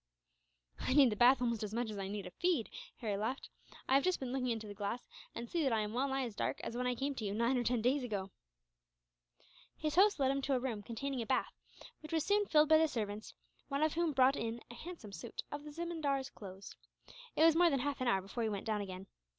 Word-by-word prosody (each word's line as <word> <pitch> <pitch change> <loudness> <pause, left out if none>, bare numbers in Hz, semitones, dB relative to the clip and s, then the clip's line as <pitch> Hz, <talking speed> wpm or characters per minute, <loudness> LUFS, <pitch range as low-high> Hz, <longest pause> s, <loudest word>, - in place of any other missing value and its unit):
"I 255 - 0
need 275 -5 +7
the - - -1
bath 250 +3 +5
almost 235 -3 0
as 210 0 -4
much 235 -2 -1
as 205 - -5
I 195 - -3
need 205 0 -4
a 180 - -7
feed," 335 - 0 0.3
Harry 215 -4 -1
laughed. 225 +6 -3 0.4
"I - - +2
have 275 +1 +5
just 370 -1 +1
been 255 -2 -4
looking 255 -1 -1
into 225 -2 -2
the 205 - -7
glass, 205 +4 -4 0.3
and 235 - -4
I - - -5
see 335 +7 -1
that 270 -4 +2
I 220 -1 +2
am 210 0 -3
well 260 +3 +1
nigh 270 0 0
as 235 - -6
dark - - -1
as 230 - -4
when 250 +1 -1
I 250 - +1
came 275 +3 -1
to 245 - -6
you, 200 -1 -2
nine 235 +4 +2
or 245 - +1
ten 240 -2 +1
days 260 +3 +2
ago." 200 -5 -3 1.5
His 305 -1 -1
host 400 -1 +5
led 265 -1 +3
him 275 0 -1
to 270 0 +1
a - - +2
room 240 -5 -3
containing 245 +5 -3
a 225 - -5
bath, 260 - 0 0.5
which 310 +1 -9
was 320 -2 +1
soon 410 0 +3
filled 305 -1 +5
by 315 0 +7
the 320 - +4
servants, 215 -5 -4 0.3
one 280 +1 0
of 310 - +2
whom 335 -1 +1
brought 265 0 +4
in 230 -1 -3
a - - -8
handsome 310 - -9
suit 230 +4 -6
of 290 +1 -5
the 300 - -7
zemindar's 295 -5 -2
clothes. 195 -1 -10 0.6
It 315 - +4
was 325 -1 +7
more 345 +1 +6
than 275 -4 +1
half 285 -1 -2
an 255 - 0
hour 195 -4 +3
before 200 +5 -5
he 225 - +1
went 200 -2 -4
down 215 -2 0
again. 190 -1 -6
250 Hz, 260 wpm, -35 LUFS, 220-285 Hz, 1.5 s, need